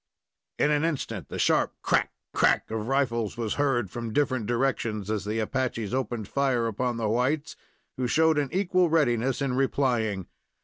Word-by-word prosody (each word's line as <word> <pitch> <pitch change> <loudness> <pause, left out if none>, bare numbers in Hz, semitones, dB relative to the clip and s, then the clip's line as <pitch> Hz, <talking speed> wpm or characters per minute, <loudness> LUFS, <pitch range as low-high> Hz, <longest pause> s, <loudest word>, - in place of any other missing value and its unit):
In 150 - +3
an 150 +1 +2
instant 130 - -3
the - - -5
sharp - - +2
crack! - - +2 0.2
crack! - - +2
of 110 0 -3
rifles 120 -5 0
was 115 -3 -1
heard 120 -8 +1
from 115 -2 -5
different 130 -6 +1
directions, 115 -4 -1
as 105 -3 -2
the 105 +2 -2
Apaches 115 -2 -2
opened 120 -5 -2
fire 135 -4 +1
upon 120 +2 -1
the 115 -2 -1
whites, 130 +7 0 0.4
who 125 -1 0
showed 160 +4 +3
an 140 -2 -1
equal 185 -2 +2
readiness 135 -4 +2
in 135 -2 0
replying. 120 -7 0
125 Hz, 165 wpm, -27 LUFS, 110-140 Hz, 0.4 s, In